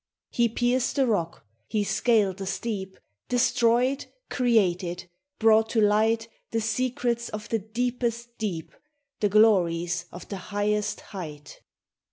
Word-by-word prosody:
He 235 Hz, -1 st, +2 dB
pierced 245 Hz, +2 st, +1 dB
the 275 Hz, -2 st, +3 dB
rock; 170 Hz, -, -1 dB, 0.2 s
he 210 Hz, -1 st, 0 dB
scaled 205 Hz, -3 st, +2 dB
the 195 Hz, -1 st, -5 dB
steep; 195 Hz, -2 st, -4 dB, 0.3 s
Destroyed; 245 Hz, +1 st, +2 dB, 0.2 s
created; 185 Hz, -8 st, +1 dB, 0.3 s
brought 220 Hz, 0 st, +4 dB
to 225 Hz, -, +1 dB
light 220 Hz, +2 st, +3 dB, 0.2 s
The 225 Hz, -, 0 dB
secrets 235 Hz, +1 st, -1 dB
of 215 Hz, 0 st, -6 dB
the 225 Hz, -, +1 dB
deepest 235 Hz, +2 st, -3 dB
deep, 180 Hz, -8 st, -3 dB, 0.5 s
The 205 Hz, -, +2 dB
glories 175 Hz, -5 st, +3 dB
of 175 Hz, -, -10 dB
the 200 Hz, -, -5 dB
highest 205 Hz, +2 st, -1 dB
height 155 Hz, -7 st, -9 dB
220 Hz, 125 wpm, -26 LUFS, 190-235 Hz, 0.5 s, brought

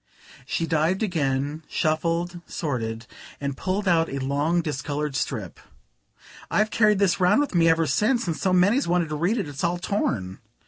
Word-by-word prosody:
She 165 Hz, -, -1 dB
dived 165 Hz, +5 st, +1 dB
again, 145 Hz, -5 st, -1 dB
shuffled, 170 Hz, +3 st, -1 dB
sorted, 115 Hz, -7 st, -3 dB, 0.3 s
and 140 Hz, -1 st, -3 dB
pulled 195 Hz, +6 st, -2 dB
out 165 Hz, -2 st, +3 dB
a 140 Hz, -, -4 dB
long 145 Hz, +6 st, 0 dB
discoloured 150 Hz, -1 st, -3 dB
strip. -, -, -3 dB, 0.9 s
"I've 215 Hz, +1 st, +1 dB
carried 210 Hz, -2 st, +4 dB
this 195 Hz, -2 st, +2 dB
round 185 Hz, +7 st, +4 dB
with 290 Hz, -5 st, -1 dB
me 165 Hz, -2 st, +4 dB
ever 165 Hz, 0 st, +3 dB
since, 235 Hz, +8 st, +1 dB
and 165 Hz, -3 st, -1 dB
so 185 Hz, -, 0 dB
many's 200 Hz, +9 st, +3 dB
wanted 175 Hz, -2 st, +1 dB
to 155 Hz, -, -3 dB
read 175 Hz, +10 st, +1 dB
it, 200 Hz, -, -2 dB
it's 145 Hz, +1 st, -6 dB
all 175 Hz, 0 st, +1 dB
torn." 100 Hz, -, -2 dB
165 Hz, 170 wpm, -24 LUFS, 145-185 Hz, 0.9 s, carried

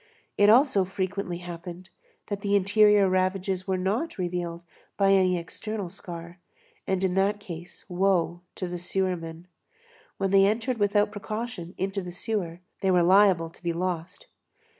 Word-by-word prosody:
It 205 Hz, 0 st, +5 dB
also 240 Hz, -3 st, +5 dB
frequently 190 Hz, -1 st, -3 dB
happened, 175 Hz, +1 st, -8 dB, 0.3 s
that 200 Hz, -1 st, -4 dB
the 200 Hz, 0 st, +1 dB
interior 205 Hz, 0 st, +5 dB
ravages 185 Hz, 0 st, 0 dB
were 190 Hz, -1 st, +1 dB
not 210 Hz, -, -1 dB
revealed 175 Hz, -2 st, -3 dB, 0.3 s
by 195 Hz, -1 st, +4 dB
any 185 Hz, -2 st, +4 dB
external 200 Hz, +3 st, -5 dB
scar, 170 Hz, 0 st, -9 dB, 0.5 s
and 190 Hz, 0 st, 0 dB
in 185 Hz, -1 st, +1 dB
that 200 Hz, +2 st, +2 dB
case, 175 Hz, -3 st, -9 dB
woe 180 Hz, -2 st, +1 dB
to 185 Hz, -, -4 dB
the 175 Hz, 0 st, -5 dB
sewermen. 175 Hz, -2 st, -3 dB, 0.7 s
When 195 Hz, -1 st, -1 dB
they 195 Hz, 0 st, +6 dB
entered 230 Hz, +3 st, -1 dB
without 205 Hz, +1 st, +2 dB
precaution 215 Hz, -4 st, -5 dB
into 195 Hz, +1 st, -2 dB
the 180 Hz, -1 st, -7 dB
sewer, 180 Hz, -2 st, -3 dB, 0.2 s
they 190 Hz, -, 0 dB
were 180 Hz, -2 st, +4 dB
liable 185 Hz, -3 st, +5 dB
to -, -, -21 dB
be 170 Hz, -1 st, -1 dB
lost. 180 Hz, +1 st, -4 dB
190 Hz, 150 wpm, -27 LUFS, 175-200 Hz, 0.7 s, they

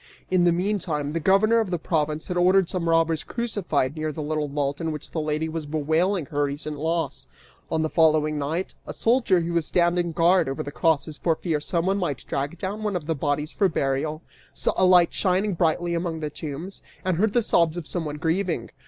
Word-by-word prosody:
In 180 Hz, -1 st, +4 dB
the 175 Hz, -, +5 dB
meantime 170 Hz, -5 st, -1 dB
the 165 Hz, -, 0 dB
governor 195 Hz, +7 st, +4 dB
of 220 Hz, -4 st, -1 dB
the 175 Hz, -, 0 dB
province 155 Hz, -1 st, -1 dB
had 180 Hz, -, -3 dB
ordered 185 Hz, +1 st, +4 dB
some 170 Hz, -2 st, -2 dB
robbers 165 Hz, -1 st, +2 dB
crucified 185 Hz, -, -1 dB
near 155 Hz, 0 st, -2 dB
the 150 Hz, +1 st, -5 dB
little 155 Hz, 0 st, -1 dB
vault 140 Hz, +1 st, -2 dB
in 165 Hz, -1 st, -1 dB
which 150 Hz, -2 st, -7 dB
the 160 Hz, -, -2 dB
lady 155 Hz, +1 st, -1 dB
was 160 Hz, -1 st, -5 dB
bewailing 160 Hz, +4 st, 0 dB
her 145 Hz, 0 st, 0 dB
recent 145 Hz, +1 st, -5 dB
loss. 165 Hz, +2 st, -2 dB, 0.4 s
On 160 Hz, -, 0 dB
the -, -, +1 dB
following 155 Hz, -2 st, +3 dB
night, 160 Hz, +6 st, -2 dB
a -, -, -5 dB
soldier 230 Hz, -6 st, +2 dB
who 170 Hz, +1 st, -3 dB
was 170 Hz, -2 st, +1 dB
standing 175 Hz, -1 st, +2 dB
guard 170 Hz, -1 st, +3 dB
over 135 Hz, -, -3 dB
the 145 Hz, -, -6 dB
crosses 155 Hz, -1 st, 0 dB
for 165 Hz, -2 st, +1 dB
fear 160 Hz, -2 st, -1 dB
someone 180 Hz, +5 st, 0 dB
might 150 Hz, -8 st, -3 dB
drag 140 Hz, +5 st, -3 dB
down 200 Hz, +4 st, -4 dB
one 210 Hz, -2 st, -1 dB
of 170 Hz, -4 st, -3 dB
the 165 Hz, -, 0 dB
bodies 150 Hz, +1 st, -1 dB
for 195 Hz, -3 st, +2 dB
burial, 150 Hz, +1 st, -1 dB, 0.3 s
saw -, -, 0 dB
a 185 Hz, -, +4 dB
light 180 Hz, -2 st, +5 dB
shining 190 Hz, +2 st, +1 dB
brightly 170 Hz, +1 st, +1 dB
among 170 Hz, -1 st, -2 dB
the 150 Hz, -1 st, -4 dB
tombs, 155 Hz, +5 st, -7 dB, 0.2 s
and 185 Hz, -3 st, +1 dB
heard 210 Hz, +3 st, +2 dB
the 240 Hz, -, +3 dB
sobs 170 Hz, -4 st, +2 dB
of 175 Hz, -, -5 dB
someone 155 Hz, -3 st, -3 dB
grieving. 160 Hz, -4 st, -1 dB
165 Hz, 210 wpm, -25 LUFS, 150-180 Hz, 0.4 s, the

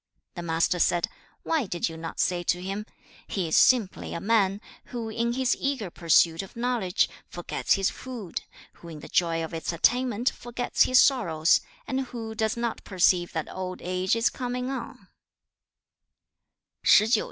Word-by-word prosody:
The 175 Hz, -, -6 dB
Master 170 Hz, +1 st, +1 dB
said, 175 Hz, 0 st, +2 dB, 0.4 s
'Why 315 Hz, -9 st, 0 dB
did 175 Hz, -2 st, -1 dB
you 165 Hz, -, -7 dB
not 165 Hz, 0 st, -7 dB
say 175 Hz, -1 st, +1 dB
to 175 Hz, 0 st, 0 dB
him, 195 Hz, +3 st, -5 dB, 0.4 s
He 185 Hz, -4 st, -2 dB
is 160 Hz, -, 0 dB
simply 235 Hz, -7 st, +3 dB
a -, -, -3 dB
man, 200 Hz, -1 st, +2 dB, 0.3 s
who 235 Hz, -2 st, -5 dB
in 235 Hz, +2 st, -1 dB
his 260 Hz, 0 st, +1 dB
eager 265 Hz, -10 st, -2 dB
pursuit 165 Hz, +1 st, +3 dB
(of 195 Hz, -, -12 dB
knowledge) 235 Hz, -6 st, +1 dB, 0.2 s
forgets 175 Hz, -, -1 dB
his 195 Hz, -2 st, +1 dB
food, 240 Hz, -8 st, -6 dB, 0.4 s
who 170 Hz, -, -11 dB
in 155 Hz, -3 st, -9 dB
the -, -, -9 dB
joy 165 Hz, -1 st, +1 dB
of 160 Hz, -, -6 dB
its 165 Hz, +1 st, -3 dB
attainment 245 Hz, +6 st, +2 dB
forgets 240 Hz, +1 st, 0 dB
his 255 Hz, 0 st, +5 dB
sorrows, 165 Hz, -, +3 dB, 0.2 s
and 265 Hz, -, -2 dB
who 230 Hz, -4 st, -6 dB
does 220 Hz, 0 st, -1 dB
not 235 Hz, -1 st, -3 dB
perceive 180 Hz, -2 st, +2 dB
that 160 Hz, -2 st, -3 dB
old 185 Hz, -1 st, -5 dB
age 185 Hz, +3 st, 0 dB
is 230 Hz, 0 st, +2 dB
coming 250 Hz, +1 st, -3 dB
on?' 270 Hz, -, -7 dB
195 Hz, 160 wpm, -26 LUFS, 175-240 Hz, 0.4 s, his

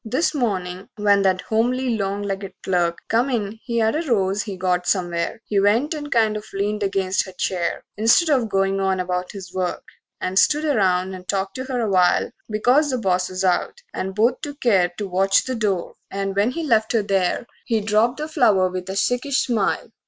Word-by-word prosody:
VIII 225 Hz, -, -9 dB
This 325 Hz, -1 st, +2 dB
morning 190 Hz, -8 st, -2 dB
when 205 Hz, -1 st, +3 dB
that 185 Hz, -2 st, +2 dB
homely, 245 Hz, +2 st, 0 dB
long 200 Hz, -1 st, -2 dB
legged 195 Hz, -1 st, -4 dB
clerk 175 Hz, -2 st, +1 dB
Come 235 Hz, +4 st, +2 dB
in 220 Hz, -3 st, -2 dB
he 235 Hz, -2 st, -3 dB
had 220 Hz, +1 st, +2 dB
a 315 Hz, -, 0 dB
rose 195 Hz, -2 st, +1 dB
he 200 Hz, -3 st, -6 dB
got 180 Hz, -1 st, 0 dB
somewhere; 175 Hz, -1 st, -1 dB
He 205 Hz, -, +1 dB
went 225 Hz, +10 st, +2 dB
and 295 Hz, -1 st, -6 dB
kind 220 Hz, -2 st, +3 dB
of 210 Hz, -, -4 dB
leaned 210 Hz, +2 st, -1 dB
against 195 Hz, -1 st, 0 dB
her -, -, -8 dB
chair, 180 Hz, -1 st, -2 dB
Instead 230 Hz, -, +4 dB
of 250 Hz, -6 st, +2 dB
goin' 195 Hz, 0 st, +1 dB
on 190 Hz, -1 st, 0 dB
about 180 Hz, 0 st, -2 dB
his 190 Hz, -3 st, -9 dB
work, 185 Hz, -1 st, -2 dB, 0.4 s
And 185 Hz, +1 st, +1 dB
stood 300 Hz, +1 st, +3 dB
around 190 Hz, -9 st, +1 dB
and 185 Hz, -1 st, -10 dB
talked 195 Hz, -1 st, -1 dB
to 260 Hz, -, -4 dB
her 255 Hz, -2 st, -2 dB
a 225 Hz, -, 0 dB
while, 185 Hz, -3 st, +3 dB, 0.2 s
Because 250 Hz, +8 st, +3 dB
the 255 Hz, -, 0 dB
boss 185 Hz, -5 st, 0 dB
was 185 Hz, 0 st, -4 dB
out, 180 Hz, -, +1 dB, 0.2 s
and 190 Hz, 0 st, -4 dB
both 235 Hz, +4 st, +2 dB
took 290 Hz, -1 st, -7 dB
care 190 Hz, -7 st, +3 dB
To 205 Hz, -, -3 dB
watch 195 Hz, +1 st, +3 dB
the 260 Hz, -, -3 dB
door; 205 Hz, -7 st, -1 dB, 0.2 s
and 195 Hz, 0 st, -3 dB
when 205 Hz, +4 st, +2 dB
he 330 Hz, +6 st, -4 dB
left 225 Hz, -6 st, +2 dB
her 225 Hz, -3 st, +2 dB
there 195 Hz, +2 st, 0 dB, 0.2 s
He 225 Hz, -2 st, +2 dB
dropped 220 Hz, +4 st, +1 dB
the 305 Hz, -, -4 dB
flower 210 Hz, -, +3 dB
with 185 Hz, 0 st, -6 dB
a 190 Hz, -, -3 dB
sickish 250 Hz, +6 st, +1 dB
smile. 225 Hz, -2 st, -1 dB
200 Hz, 210 wpm, -22 LUFS, 185-235 Hz, 0.4 s, Instead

